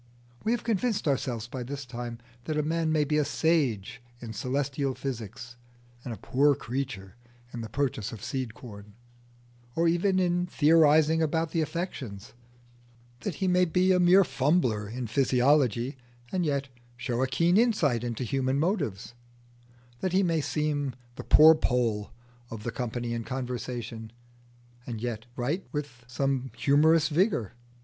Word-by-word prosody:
We 220 - +1
have 240 - 0
convinced 220 -3 0
ourselves 125 -5 -1
by 125 +1 -6
this 140 +3 -6
time 120 -1 -6 0.3
that 155 - -2
a 150 - +1
man 160 +1 0
may 155 -1 +3
be 150 +1 +1
a - - +3
sage 135 - 0 0.2
in 115 -2 -7
celestial 135 +3 -2
physics 120 -2 -6 0.5
and 125 - -6
a 115 - -5
poor 140 +8 +2
creature 125 -7 -5 0.4
in 120 - -5
the 110 - -6
purchase 125 -4 -2
of 110 -2 -9
seed 120 0 -3
corn, 105 -4 -12 0.8
or 170 +1 +2
even 180 +3 +2
in 180 -1 +1
theorising 160 0 +4
about 160 0 0
the 165 - +1
affections; 135 - -5 0.9
that 185 +2 -4
he 190 - -1
may 180 0 +4
be 180 +2 +2
a 180 - +4
mere 180 +2 +6
fumbler 130 - +1
in 125 +2 -4
physiology 130 +1 +2 0.3
and 180 -3 0
yet 140 -1 -1 0.3
show 120 0 -2
a 130 - +2
keen 165 +8 +2
insight 185 - +2
into 120 +1 -3
human 130 +2 0
motives; 145 - -1 0.9
that 185 +5 -2
he 195 +1 +4
may 165 -3 +1
seem 145 -3 -1 0.2
the - - -7
"poor 160 +1 +8
Poll" 120 -8 0 0.4
of 110 -2 -7
the 120 - -3
company 120 0 -3
in 115 -1 -3
conversation 120 -3 -5 0.8
and 115 -3 -4
yet 115 -1 -4
write 145 +10 -2
with 145 -5 -5
some 135 +1 -1
humorous 155 +2 +4
vigour. 155 - +1
135 Hz, 155 wpm, -28 LUFS, 120-160 Hz, 0.9 s, poor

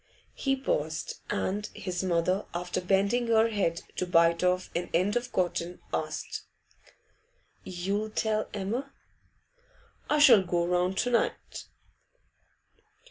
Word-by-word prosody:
He 270 -1 0
paused, 385 - -2
and 205 +2 -1
his 180 -1 -3
mother, 185 +2 +1
after 180 +1 -2
bending 200 +6 +2
her 225 0 +4
head 190 -6 -1
to 180 - -1
bite 170 0 +4
off 180 0 +1
an 175 +1 -2
end 185 +6 +2
of 245 0 -2
cotton, 175 -1 -1
asked - - -3 1.2
'You'll 195 +4 -2
tell 215 0 -1
Emma?' 225 +8 -3 1.2
'I 300 - +3
shall 270 -9 +8
go 175 -1 0
round 180 +2 +1
to 245 - +1
night. 235 - -1
190 Hz, 120 wpm, -29 LUFS, 180-225 Hz, 1.2 s, shall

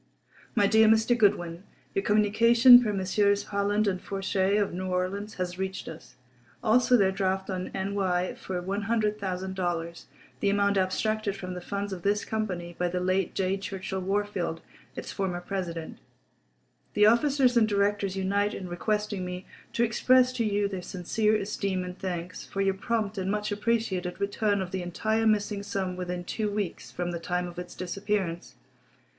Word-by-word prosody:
_ - - -37 0.5
My 205 - +4
Dear 220 +2 +5
Mr. 225 +2 +4
Goodwin:—Your 195 -2 -1
communication 230 +4 +7
per 220 -3 0
Messrs. 200 +1 +1
Howland 205 +1 +1
and 185 -2 -1
Fourchet, 195 0 0
of 205 -3 0
New 185 +1 -3
Orleans, 185 +3 -2
has 180 0 -4
reached 190 0 -4
us. 160 - -10 0.5
Also 245 +2 +4
their 195 -3 +3
draft 190 0 -1
on 185 -1 -3
N. 195 +1 -2
Y. 185 -2 0
for 185 -1 -5
$100,000, 190 -4 -2 0.3
the 200 - +2
amount 200 0 +2
abstracted 205 +2 0
from 185 -2 -6
the 180 - -6
funds 200 +2 -3
of 180 - -6
this 205 +3 +1
company 180 -6 -3
by 180 - +2
the 180 +1 -2
late 185 +1 0
J. 190 0 0
Churchill 190 -1 -4
Wahrfield, 195 -4 -2 0.3
its - - -6
former 185 -3 -2
president.… 175 -3 -5 1.0
The 210 - +6
officers 255 +3 +4
and 230 -2 +5
directors 200 -1 0
unite 200 +2 0
in 185 - -6
requesting 205 +2 -2
me 180 0 -5 0.3
to 235 - +2
express 255 +2 +4
to 245 -2 0
you 205 -1 +1
their 190 -2 -5
sincere 210 +5 0
esteem 200 -2 -1
and 180 0 -6
thanks 180 -1 -5
for 195 - -4
your 195 0 +2
prompt 215 +1 -2
and 190 0 -2
much 210 +1 -1
appreciated 205 -4 -1
return 200 0 0
of 180 - -8
the 190 -1 -2
entire 220 +6 0
missing 210 -1 +1
sum 195 -2 -3
within 180 -1 -4
two 210 +4 -2
weeks 205 -3 -3
from 175 0 -3
the 170 - -4
time 180 +1 -2
of 175 0 -8
its 180 - -8
disappearance. 185 -2 -3
195 Hz, 165 wpm, -28 LUFS, 185-210 Hz, 1.0 s, communication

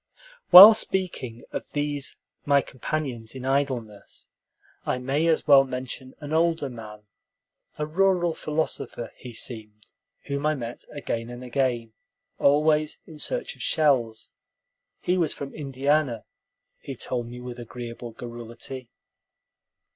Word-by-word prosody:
While 195 +5 +13
speaking 180 - -2
of - - -6
these 145 -1 -2 0.3
my 140 -2 +3
companions 130 -4 -4
in 130 -1 -7
idleness, 130 -6 -3 0.5
I - - -1
may 135 +6 0
as 160 -1 +2
well 140 -2 +8
mention 130 0 -6
an 150 0 -6
older 165 -3 +2
man, 105 -3 -10 0.7
a 150 - -1
rural 175 +1 +2
philosopher, 150 -7 -3
he 125 - -10
seemed, 110 -2 -5 0.3
whom 140 0 -3
I 155 - +2
met 120 -3 -7
again 115 -5 -4
and 120 +1 -8
again, 125 -3 -1 0.5
always 150 +1 +3
in 155 -2 -12
search - - -3
of - - -13
shells. 130 -8 +1 0.7
He 180 +1 +1
was 165 -4 0
from 140 -1 -7
Indiana, 140 -3 0 0.5
he 135 - -7
told 120 0 -3
me 120 +1 -9
with 125 0 -8
agreeable 120 0 -7
garrulity. 120 +2 -8
135 Hz, 125 wpm, -25 LUFS, 120-150 Hz, 0.7 s, While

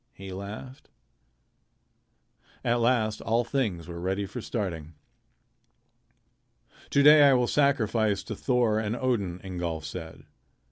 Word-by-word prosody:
he 95 -1 -9
laughed. 105 +7 -9 1.7
At 120 +1 +1
last 115 -3 +1
all 115 +2 +1
things 110 - -2
were 85 -1 -7
ready 95 +3 -2
for 105 +5 -7
starting. 85 -9 -4 1.9
"To 140 - +3
day 150 +1 +8
I - - +5
will 125 -1 +3
sacrifice 115 -7 +1
to 110 - -6
Thor 120 -2 +1
and 110 +1 -2
Odin," 105 -9 -1
Ingolf 85 -4 -4
said. 80 +1 -8
110 Hz, 120 wpm, -27 LUFS, 90-125 Hz, 1.9 s, day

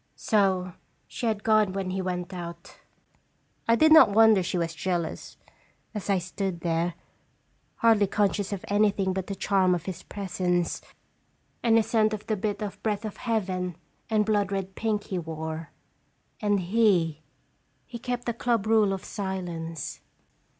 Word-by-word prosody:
" - - -44
So 190 -4 +1 0.3
she 240 - -4
had 215 -2 -1
gone 215 -3 +3
when 190 -1 -2
he 190 +1 -2
went 180 0 -3
out. 170 0 -8 0.9
I 230 - +5
did 315 +5 +5
not 320 - +9
wonder 220 -1 +6
she 180 0 -2
was 165 -1 -1
jealous, 170 0 -3 0.6
as 210 -2 -5
I 195 - +4
stood 185 0 -3
there, 170 0 0 0.8
hardly 220 -3 +4
conscious 205 0 0
of 200 -2 -4
anything 200 -2 +2
but 190 -1 -3
the 200 - -4
charm 190 -2 +2
of 175 -1 -6
his 185 -2 -5
presence, 180 -3 -2 0.8
and 230 -1 +4
the 225 - +4
scent 220 0 +2
of 210 - -11
the 215 - 0
bit 210 +1 -2
of 205 -1 -6
breath 210 0 -1
of 215 - -6
heaven 185 -6 -2 0.3
and 215 -1 +2
blood 205 -2 +1
red 195 -1 -3
pink 215 0 -1
he 185 - -3
wore. 160 -1 -5 0.7
And 205 -1 +2
he 180 -6 +2 0.6
he 235 - -8
kept 245 0 -3
the 235 - -1
club 235 -2 0
rule 215 -3 +4
of 190 - -5
silence. 175 - -5
195 Hz, 160 wpm, -27 LUFS, 180-215 Hz, 0.9 s, not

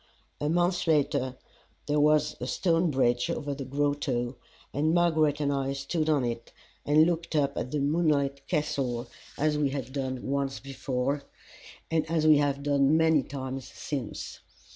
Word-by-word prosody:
A 150 - -1
month 175 +2 +1
later 135 -4 +1 0.5
there 150 0 +1
was 150 0 +3
a 125 - -4
stone 170 +5 +1
bridge 125 -1 +1
above 145 -4 -3
the 135 - -5
grotto, 135 -3 -1 0.4
and 155 +4 +1
Margaret 160 -4 +3
and 145 -1 +1
I 135 0 -1
stood 155 +3 -2
on 145 -5 +2
it 115 -1 -4 0.3
and 155 +2 +5
looked 170 -1 -2
up 140 -2 +1
at 125 - -3
the 150 - -2
moonlit 140 -2 +1
Castle, 130 -6 -1 0.3
as 150 0 +1
we 145 -2 +2
had 135 -2 -5
done 130 -2 -3
once 140 0 -1
before, 135 0 -2 0.7
and 160 -1 +2
as 160 -2 +1
we 155 -1 +7
have 140 -1 0
done 145 +1 +3
many 160 -2 +4
times 130 -1 -6
since. 135 -7 -5
145 Hz, 160 wpm, -28 LUFS, 135-155 Hz, 0.7 s, we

